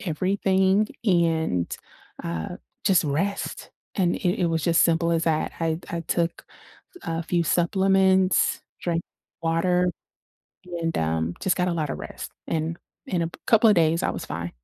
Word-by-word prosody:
everything 190 +3 +2 0.2
and, 165 - +2 0.6
uh, 85 -1 -4 0.3
just 185 -5 +4
rest, 175 +8 -2 0.2
and 180 -4 +1
it 180 +2 0
it - - +3
was 165 -2 0
just 165 -1 +4
simple 170 0 +2
as 165 -1 +1
that. 160 -2 0
I 165 -1 +1
d 170 - -14
I 170 - -2
took 170 +1 -1 0.6
a 165 0 -2
few 170 0 0
supplements, 190 +2 +3 0.2
drank 170 -1 -1 0.4
water, 180 +2 +2 0.9
and, 165 0 -1
um, 80 +1 0
just 190 - +2
got 180 0 +1
a 175 - 0
lotta 155 -4 -1
rest, - - -7 0.2
and 165 +1 -1 0.3
in 175 -3 0
a 165 - -1
p - - -14
couple 225 0 +5
of 205 - +4
days, 165 0 +3
I - - +2
was - - -5
fine. 85 +1 -4
170 Hz, 160 wpm, -25 LUFS, 160-185 Hz, 0.9 s, couple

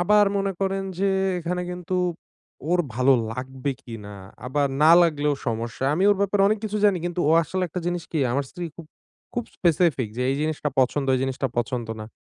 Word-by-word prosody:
আবার 210 +4 +5
মনে 195 0 0
করেন 195 0 0 0.2
যে 195 +1 +2 0.3
এখানে 180 +1 -2
কিন্তু 180 +1 -3 0.7
ওর 180 - +3 0.2
ভালো 130 +3 +4 0.2
লাগবে 130 +3 -4
কিনা? 105 -3 -9 0.3
আবার 140 +2 +1 0.2
না 155 - +7
লাগলেও 150 -3 +1
সমস্যা। 115 +2 -2
আমি 185 +5 +1
ওর 205 - +3
ব্যাপারে 200 0 +2
অনেক 215 +1 +1
কিছু 210 -1 -2
জানি 200 -3 +4
কিন্তু 175 0 -3
ও - - +5
আসলে 185 +4 -3
একটা 180 +3 -4
জিনিস 175 -1 -1
কী, 160 - 0
আমার 140 +2 0
স্ত্রী 175 - -6
খুব, 170 - -10 0.5
খুব 240 - -1
স্পেসিফিক 165 - +2
যে 125 - -1
এই 135 - 0
জিনিসটা 155 -1 -1
পছন্দ, 135 +2 +1
এই 130 - 0
জিনিসটা 135 0 -1
পছন্দ 120 0 -1
না। 110 - -6
160 Hz, 190 wpm, -24 LUFS, 130-185 Hz, 0.7 s, না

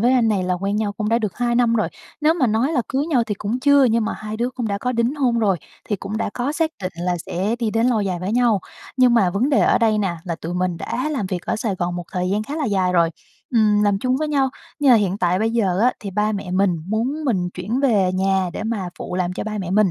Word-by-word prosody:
với 245 +3 +4
anh 240 -3 +3
này 200 -3 +1
là 180 0 0
quen 195 +3 -2
nhau 210 -2 -1
cũng 210 0 -3
đã 230 +1 +3
được 210 -5 -3
2 240 -1 0
năm 235 -1 +3
rồi. 215 - +1 0.3
Nếu 310 +2 +4
mà 265 -8 +2
nói 230 +7 +1
là 260 -6 +1
cưới 275 +3 -1
nhau 275 -8 +2
thì 210 - -2
cũng 210 +5 -3
chưa, 285 0 +5
nhưng 230 -2 +2
mà - - -2
hai 215 0 -6
đứa 240 +3 -1
cũng 245 -3 -3
đã 200 -1 -1
có 250 +4 -1
đính 235 +3 0
hôn 250 -5 +1
rồi, 200 -4 +2 0.3
thì 205 - 0
cũng 195 +3 -5
đã 220 - -2
có 255 +4 -1
xác 320 0 0
định 185 - -3
là 175 +1 -1
sẽ 200 +6 -1
đi 230 -2 0
đến 225 +2 +1
lâu 240 -4 +2
dài 190 -3 -1
với 190 +3 -2
nhau. 235 -4 +3 0.4
Nhưng 250 -2 +5
mà 200 -6 +4
vấn 205 +9 +1
đề 280 - +4
ở - - +4
đây 220 -2 +2
nè, 190 -4 -1
là 170 - -2
tụi 170 +2 -4
mình 180 -1 -1
đã 255 - -3
làm 265 -10 -2
việc 185 -2 -3
ở - - 0
Sài 215 -2 -2
Gòn 175 -1 -2
một 175 - -5
thời 180 0 -1
gian 205 +2 0
khá 285 +8 -6
là 310 - -1
dài 190 -6 +1
rồi, 170 -2 +3 0.4
ừm, 215 -3 +3
làm 205 -1 +2
chung 255 +4 0
với 305 +2 -1
nhau. 275 -3 +2 0.3
Nhưng 285 -2 +4
mà - - +8
hiện 200 -2 0
tại 180 0 +1
bây 220 +2 +1
giờ 200 -6 +1
á, 250 +3 +4
thì 200 - -5
ba 210 +2 0
mẹ 195 -3 -4
mình 185 -1 +2
muốn 250 +9 -1
mình 190 -10 0
chuyển 210 +8 -2
về 205 -9 +3
nhà 190 -1 +1
để - - -5
mà 215 -5 -2
phụ - - -5
làm 180 -1 -1
cho - - -4
ba 215 -1 -4
mẹ 185 -3 -4
mình. 200 0 +3
215 Hz, 290 wpm, -21 LUFS, 190-245 Hz, 0.4 s, mà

